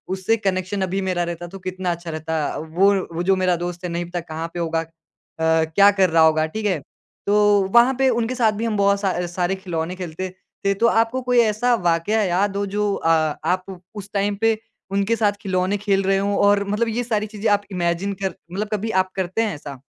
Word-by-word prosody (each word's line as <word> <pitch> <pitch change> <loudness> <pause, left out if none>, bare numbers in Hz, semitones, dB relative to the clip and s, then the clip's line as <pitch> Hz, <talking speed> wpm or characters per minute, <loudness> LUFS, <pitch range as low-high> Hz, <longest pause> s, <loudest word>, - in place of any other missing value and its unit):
उससे 190 +4 +1
कनेक्शन 190 -1 -2
अभी 190 +1 -1
मेरा 185 -2 0
रहता 175 0 -5
तो 195 +3 -10
कितना 185 0 -3
अच्छा 170 0 -6
रहता 160 0 -2
अ, - - -4
वो 175 +6 +2 0.2
वो 170 +2 -2
जो 190 +2 +3
मेरा 185 -1 +2
दोस्त 175 +1 -5
है 180 - -3
नहीं 170 +1 -2
पता 175 +1 -4
कहाँ 165 0 -5
पे 175 - -5
होगा। 165 -1 0
अ, - - -7 0.6
क्या 160 +4 +4
कर 195 -2 +3
रहा 160 0 +4
होगा, 155 0 +4
ठीक 215 +7 -5
है? 185 -6 +1 0.5
तो 205 0 +4
वहाँ 240 +2 +6
पे 270 - +4
उनके 240 0 0
साथ 230 -3 +3
भी 215 +2 -3
हम 220 -2 -1
बहुत 200 0 +3
सा 185 -3 -1
सारे 175 +2 -1
खिलौने 180 -2 -4
खेलते 185 0 -5 0.4
थे। 200 - +3
तो 230 +4 +2
आपको 230 +3 +2
कोई 250 -1 +2
ऐसा 230 +2 +2
वाक़या 180 +1 +1
हो 200 - 0
जो 205 +1 -1
अ, 165 - -1 0.4
आप 185 0 -2
उस 205 -1 -8
टाइम 200 0 0
पे 225 -1 +3 0.3
उनके 200 +3 +1
साथ 210 -2 +2
खिलौने 190 -1 0
खेल 195 -1 +1
रहे 195 0 +2
हों 200 +1 0
और 205 0 +4
मतलब 210 +3 0
ये 230 +2 -1
सारी 215 -3 -1
चीज़ें 215 +1 -2
आप 205 0 +2
इमैजिन 175 +2 -1
कर 190 - -1 0.2
मतलब 205 +4 -3
कभी 215 +2 -2
आप 185 - -21
करते 190 +3 -1
हैं 215 - -1
ऐसा? 140 -2 -9
195 Hz, 220 wpm, -22 LUFS, 175-210 Hz, 0.6 s, वहाँ